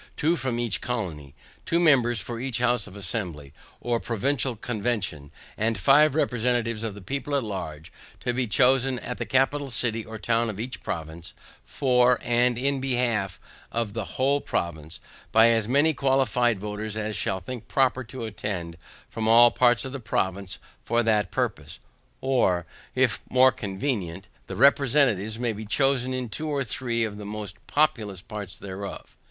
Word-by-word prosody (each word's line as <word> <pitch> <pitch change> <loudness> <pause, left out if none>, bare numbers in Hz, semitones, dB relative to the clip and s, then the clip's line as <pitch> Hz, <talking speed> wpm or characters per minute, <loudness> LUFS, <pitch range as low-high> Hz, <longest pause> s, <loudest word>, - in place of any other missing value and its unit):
two 160 +3 +2
for 130 -4 -2
each 120 -3 -1
colony. 85 - -4 0.3
Two 170 - +1
members 125 -8 +4
for 115 +4 -5
each 125 -2 -2
House 120 -3 +1
of 95 - -12
Assembly, 90 -8 -4 0.3
or 120 -1 -1
Provincial 125 +3 0
Convention; 105 - -3 0.3
and 110 0 0
five 145 +7 +5
representatives 120 -5 0
of 110 -3 -3
the 105 - -11
people 140 +6 -3
at 140 - +1
large, 80 -7 -6 0.3
to 125 - -1
be 125 0 -1
chosen 130 +3 +3
in 125 0 -5
the 120 - -4
capital 135 +4 +1
city 115 -2 -1
or 110 0 -8
town 115 +2 +1
of 105 -1 -6
each 125 +3 -5
province, 80 0 -6 0.3
for, 125 -2 +3
and 120 0 +2
in 135 +1 0
behalf 120 -8 -1 0.3
of 115 -3 -2
the 110 0 -3
whole 140 +2 +2
province, 80 -2 -4 0.3
by 115 +1 +6
as 115 -2 +2
many 145 +6 +3
qualified 125 -5 +2
voters 105 +1 -4
as 110 0 -2
shall 95 0 -1
think 120 +5 -8
proper 130 -1 +2
to 120 0 -7
attend 90 -6 -5 0.3
from 110 -1 -3
all 120 +1 +7
parts 125 0 +3
of 130 - -5
the 135 - -5
province 95 -4 -2 0.3
for 120 +1 +1
that 110 -2 +2
purpose; - - -3 0.4
or, 105 -10 +2 0.3
if - - +2
more 130 +1 +6
convenient, 95 -5 -3 0.2
the 95 - -6
representatives 125 -4 +3
may 120 -1 -1
be 110 +1 -7
chosen 130 +3 +1
in 130 -1 -2
two 155 +9 -4
or 140 -2 0
three 120 -1 -1
of 105 -2 -4
the - - -7
most 105 -2 -6
populous 115 - +1
parts 105 -2 -7
thereof. 100 0 -8
115 Hz, 165 wpm, -26 LUFS, 105-130 Hz, 0.4 s, all